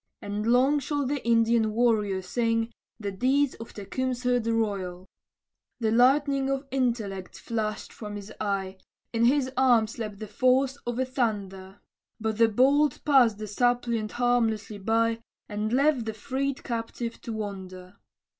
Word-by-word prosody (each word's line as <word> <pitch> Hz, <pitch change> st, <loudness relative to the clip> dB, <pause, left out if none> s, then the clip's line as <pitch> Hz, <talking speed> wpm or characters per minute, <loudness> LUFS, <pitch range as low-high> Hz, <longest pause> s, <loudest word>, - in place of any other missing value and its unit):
And 205 Hz, +2 st, -4 dB
long 260 Hz, +5 st, +4 dB
shall 285 Hz, +1 st, -2 dB
the 280 Hz, +1 st, -2 dB
Indian 230 Hz, -1 st, +3 dB
warrior 210 Hz, -5 st, +1 dB
sing 230 Hz, +2 st, 0 dB, 0.3 s
The 205 Hz, -2 st, -3 dB
deeds 260 Hz, +7 st, +2 dB
of 225 Hz, -, -8 dB
Tecumseh 250 Hz, +4 st, -1 dB
the 230 Hz, 0 st, -1 dB
royal. 195 Hz, -5 st, -2 dB, 0.7 s
The 220 Hz, -2 st, +1 dB
lightning 270 Hz, +3 st, +3 dB
of 275 Hz, +1 st, -1 dB
intellect 230 Hz, -8 st, -2 dB
flashed 215 Hz, -2 st, -3 dB
from 210 Hz, -2 st, -7 dB
his 205 Hz, 0 st, -8 dB
eye, 195 Hz, -2 st, -2 dB, 0.4 s
In 230 Hz, 0 st, +3 dB
his 260 Hz, +1 st, +2 dB
arm 245 Hz, -4 st, +4 dB
slept 215 Hz, -2 st, -6 dB
the 215 Hz, -, -6 dB
force 255 Hz, +4 st, +2 dB
of 240 Hz, -, -1 dB
the 260 Hz, +2 st, 0 dB
thunder, 200 Hz, -6 st, -3 dB, 0.4 s
But 220 Hz, 0 st, -2 dB
the 230 Hz, -1 st, +6 dB
bolt 280 Hz, +7 st, +3 dB
passed 255 Hz, -7 st, +5 dB
the 215 Hz, -, -5 dB
suppliant 235 Hz, 0 st, 0 dB
harmlessly 225 Hz, -4 st, 0 dB
by, 225 Hz, +2 st, +1 dB, 0.3 s
And 210 Hz, +1 st, -3 dB
left 270 Hz, -1 st, +2 dB
the 220 Hz, -1 st, -4 dB
freed 270 Hz, +4 st, -3 dB
captive 230 Hz, -1 st, -4 dB
to 230 Hz, -, -5 dB
wonder. 190 Hz, -3 st, -7 dB
230 Hz, 145 wpm, -27 LUFS, 210-255 Hz, 0.7 s, the